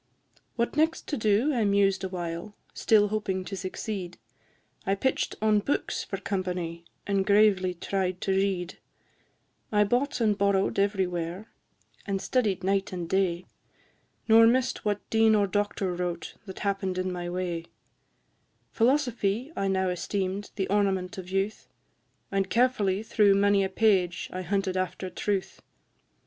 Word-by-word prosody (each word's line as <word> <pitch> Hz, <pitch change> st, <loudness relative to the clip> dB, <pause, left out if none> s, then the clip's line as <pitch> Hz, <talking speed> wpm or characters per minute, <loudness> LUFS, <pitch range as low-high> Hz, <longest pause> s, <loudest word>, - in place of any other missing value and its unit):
V. -, -, -30 dB
What 235 Hz, +2 st, -1 dB
next 320 Hz, +2 st, +1 dB
to 295 Hz, -, 0 dB
do 220 Hz, +6 st, +2 dB
I 235 Hz, -4 st, +1 dB
mused 200 Hz, -1 st, +2 dB
awhile, 175 Hz, +1 st, -5 dB, 0.2 s
Still 210 Hz, -2 st, +3 dB
hoping 195 Hz, -3 st, -2 dB
to 195 Hz, -, -5 dB
succeed; 185 Hz, 0 st, -5 dB, 0.7 s
I 195 Hz, -, +1 dB
pitch'd 260 Hz, +7 st, -1 dB
on 215 Hz, -1 st, +4 dB
books 275 Hz, +8 st, -1 dB
for -, -, -5 dB
company, 180 Hz, -3 st, -3 dB, 0.2 s
And 200 Hz, -1 st, +1 dB
gravely 200 Hz, -3 st, +3 dB
tried 185 Hz, 0 st, -2 dB
to 195 Hz, -, 0 dB
read: 190 Hz, -2 st, -1 dB, 0.9 s
I 210 Hz, -1 st, +4 dB
bought 245 Hz, +8 st, 0 dB
and 215 Hz, -3 st, +2 dB
borrow'd 200 Hz, -1 st, +1 dB
everywhere, 190 Hz, -1 st, -1 dB, 0.6 s
And 195 Hz, -1 st, -1 dB
studied 205 Hz, -5 st, 0 dB
night 195 Hz, +2 st, 0 dB
and 175 Hz, -2 st, -4 dB
day, 180 Hz, -1 st, 0 dB, 0.8 s
Nor 225 Hz, 0 st, +7 dB
miss'd 255 Hz, +2 st, +2 dB
what 205 Hz, -1 st, -2 dB
dean 220 Hz, -1 st, +5 dB
or 205 Hz, -1 st, +3 dB
doctor 200 Hz, -1 st, -1 dB
wrote 175 Hz, -1 st, -4 dB
That 190 Hz, -, -8 dB
happen'd 195 Hz, -2 st, -1 dB
in 185 Hz, 0 st, -1 dB
my 175 Hz, -1 st, -4 dB
way: 175 Hz, -2 st, -3 dB, 1.1 s
Philosophy 245 Hz, -1 st, +1 dB
I 195 Hz, -, -1 dB
now 190 Hz, -1 st, +1 dB
esteem'd 190 Hz, +2 st, -2 dB
The 195 Hz, -2 st, -1 dB
ornament 195 Hz, -2 st, 0 dB
of 180 Hz, -1 st, -8 dB
youth, 195 Hz, +3 st, -2 dB, 0.6 s
And 195 Hz, -1 st, 0 dB
carefully 220 Hz, -5 st, +2 dB
through 210 Hz, -2 st, +4 dB
many 200 Hz, 0 st, +3 dB
a 190 Hz, -, -1 dB
page 190 Hz, -4 st, +1 dB
I 185 Hz, -, -3 dB
hunted 190 Hz, +1 st, -1 dB
after 185 Hz, 0 st, -3 dB
truth. 200 Hz, -2 st, -2 dB
195 Hz, 145 wpm, -27 LUFS, 185-210 Hz, 1.1 s, Nor